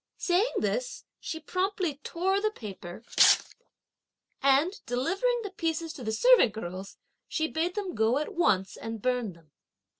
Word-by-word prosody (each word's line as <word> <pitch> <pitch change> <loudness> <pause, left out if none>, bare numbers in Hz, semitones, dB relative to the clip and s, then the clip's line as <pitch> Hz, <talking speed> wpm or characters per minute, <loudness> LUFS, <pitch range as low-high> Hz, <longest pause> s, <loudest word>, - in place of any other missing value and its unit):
Saying 375 +7 +1
this, - - -2
she 320 - -5
promptly 365 -1 -2
tore 380 +4 0
the 430 - +2
paper, 200 - -9 1.4
and, 280 +8 +3
delivering 390 - 0
the 405 - -5
pieces 330 -2 -2
to 265 - -9
the 220 - -2
servant 480 - +5
girls, 190 -2 -7 0.3
she 315 -1 -1
bade 330 +3 -2
them 395 -4 -3
go 220 +4 +2
at 300 - -3
once 195 - +1
and 225 0 -6
burn 245 -3 -1
them. 165 -3 -22
315 Hz, 145 wpm, -28 LUFS, -, 1.4 s, servant